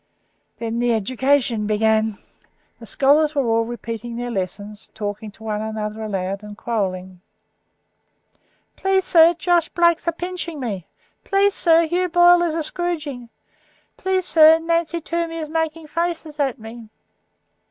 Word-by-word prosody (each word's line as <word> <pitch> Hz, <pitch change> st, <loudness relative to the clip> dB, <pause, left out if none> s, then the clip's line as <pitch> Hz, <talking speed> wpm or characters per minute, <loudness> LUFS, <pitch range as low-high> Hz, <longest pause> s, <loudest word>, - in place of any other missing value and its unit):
Then 230 Hz, 0 st, -3 dB
education 240 Hz, 0 st, +1 dB
began; 220 Hz, 0 st, +1 dB, 0.6 s
the 230 Hz, -, -12 dB
scholars 300 Hz, +5 st, +3 dB
were 280 Hz, -3 st, +1 dB
all 230 Hz, 0 st, +1 dB
repeating 235 Hz, 0 st, -6 dB
their 245 Hz, +1 st, -4 dB
lessons, 205 Hz, +1 st, -5 dB
talking 210 Hz, 0 st, -5 dB
to 215 Hz, +2 st, -16 dB
one 215 Hz, -1 st, -3 dB
another 220 Hz, 0 st, -4 dB
aloud 195 Hz, -1 st, -3 dB
and 210 Hz, 0 st, -10 dB
quarrelling. 185 Hz, -6 st, -3 dB, 1.5 s
"Please, 385 Hz, 0 st, +1 dB
sir, 335 Hz, -1 st, +5 dB
Josh 345 Hz, -1 st, +1 dB
Blake's 340 Hz, -1 st, +2 dB
a -, -, +3 dB
pinching 345 Hz, -2 st, -5 dB
me." 205 Hz, -9 st, -5 dB, 0.4 s
"Please, 400 Hz, 0 st, +2 dB
sir, 335 Hz, -2 st, +4 dB
Hugh 360 Hz, +3 st, 0 dB
Boyle 350 Hz, +1 st, +6 dB
is 335 Hz, -2 st, 0 dB
a 325 Hz, -, -1 dB
scroodgin." 300 Hz, -8 st, -3 dB, 0.7 s
"Please, 375 Hz, -1 st, -1 dB
sir, 315 Hz, 0 st, +7 dB
Nancy 335 Hz, +1 st, -1 dB
Toomey 335 Hz, 0 st, -3 dB
is 310 Hz, -2 st, -5 dB
making 320 Hz, 0 st, -2 dB
faces 325 Hz, -1 st, -3 dB
at 270 Hz, -3 st, 0 dB
me." 225 Hz, 0 st, -11 dB
275 Hz, 135 wpm, -21 LUFS, 220-335 Hz, 1.5 s, sir